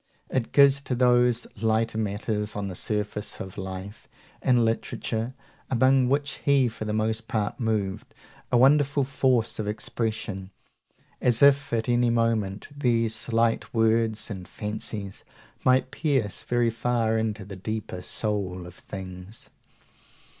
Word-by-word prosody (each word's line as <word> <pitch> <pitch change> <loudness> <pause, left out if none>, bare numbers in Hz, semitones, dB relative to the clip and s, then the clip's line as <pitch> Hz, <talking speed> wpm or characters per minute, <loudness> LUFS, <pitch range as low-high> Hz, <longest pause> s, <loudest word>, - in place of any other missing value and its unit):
It 125 -3 -1
gives 140 -1 +6
to 135 -2 -2
those 125 -1 +3 0.2
lighter 110 0 +1
matters 105 0 -2
on 100 -1 -3
the - - -5
surface 105 +2 -3
of 95 -1 -7
life 95 +1 -7 0.3
and 125 -3 +3
literature 115 +1 -2 0.3
among 130 0 +4
which 140 +1 0
he 140 -3 +4
for 110 -1 -7
the 105 - -2
most 110 +1 -1
part 110 +2 -2
moved, 105 -5 -2 0.4
a 125 - +4
wonderful 140 +2 +4
force 130 -4 +1
of 105 - -2
expression, 105 -3 -3 0.7
as 120 +1 +3
if 140 0 +5
at 115 0 0
any 120 0 +3
moment 115 -4 0
these 115 -5 +1
slight 115 0 0
words 110 -1 +2
and 95 -3 -7
fancies 105 -2 -5 0.4
might 130 0 +3
pierce 140 - 0
very 120 -1 +1
far 115 -1 0
into 110 -2 -2
the 100 0 -8
deeper 105 -1 -5
soul 95 -4 -2
of 90 - -10
things. 95 +2 -9
115 Hz, 135 wpm, -26 LUFS, 105-125 Hz, 0.7 s, gives